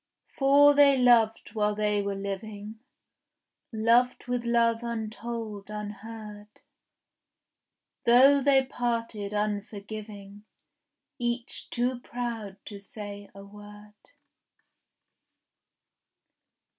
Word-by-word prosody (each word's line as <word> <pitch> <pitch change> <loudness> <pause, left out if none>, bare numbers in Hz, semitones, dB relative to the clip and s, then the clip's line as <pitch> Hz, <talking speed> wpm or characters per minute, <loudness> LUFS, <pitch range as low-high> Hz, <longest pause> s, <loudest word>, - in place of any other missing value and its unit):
For 285 +1 +6
they 285 -1 +6
loved 235 -4 +3
while 210 -1 0
they 210 -1 0
were 200 0 -3
living, 205 +2 -6 0.9
Loved 235 +3 +2
with 245 -1 -2
love 230 -1 +2
untold, 225 -2 -5
unheard; 210 0 -8 1.6
Though 270 +4 +6
they 270 -1 +4
parted 230 -5 -3
unforgiving, 205 0 -5 0.7
Each 240 0 -3
too 245 +1 -1
proud 235 -5 -5
to 205 -2 -8
say 205 0 -9
a 195 0 -11
word. 210 +1 -14
220 Hz, 80 wpm, -27 LUFS, 205-240 Hz, 1.6 s, For